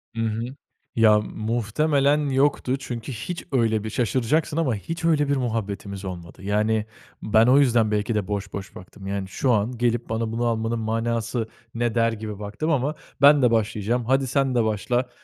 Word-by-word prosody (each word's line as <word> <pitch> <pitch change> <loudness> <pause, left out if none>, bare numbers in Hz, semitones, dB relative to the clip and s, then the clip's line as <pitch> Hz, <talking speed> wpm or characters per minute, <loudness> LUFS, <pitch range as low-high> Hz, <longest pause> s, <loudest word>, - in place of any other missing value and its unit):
Hı 115 - -2
hı. 115 0 -1 0.5
Ya, 110 -2 +6
muhtemelen 120 +8 +1
yoktu 135 -1 +1
çünkü 120 -1 -6
hiç 135 +10 -5
öyle 110 -4 +2
bir 110 - -4
şaşıracaksın 130 +7 0
ama 135 -8 +1
hiç 165 - -5
öyle 150 -3 +3
bir 140 - +3
muhabbetimiz 100 -5 -3
olmadı. 90 0 -8
Yani 105 +2 +1 0.4
ben 110 +2 +4
o 130 +2 +6
yüzden 120 -5 +3
belki 105 +2 0
de 100 -3 -1
boş 100 -1 -4
boş 100 -1 -7
baktım. 95 +2 -11
Yani, 100 -1 -3
"Şu 125 +7 0
an 110 +2 +2
gelip 120 -1 0
bana 115 0 -1
bunu 120 +1 -1
almanın 115 0 0
manası 115 +1 -1 0.3
ne?" 120 0 0
der 115 0 +3
gibi 110 -2 -6
baktım 105 +10 -3
ama 145 +2 0 0.3
"Ben 145 0 +7
de 120 -2 +4
başlayacağım, 115 +2 0
hadi 135 +1 +2
sen 135 0 +1
de 120 - +3
başla, 120 +4 0
115 Hz, 175 wpm, -24 LUFS, 105-130 Hz, 0.5 s, Ben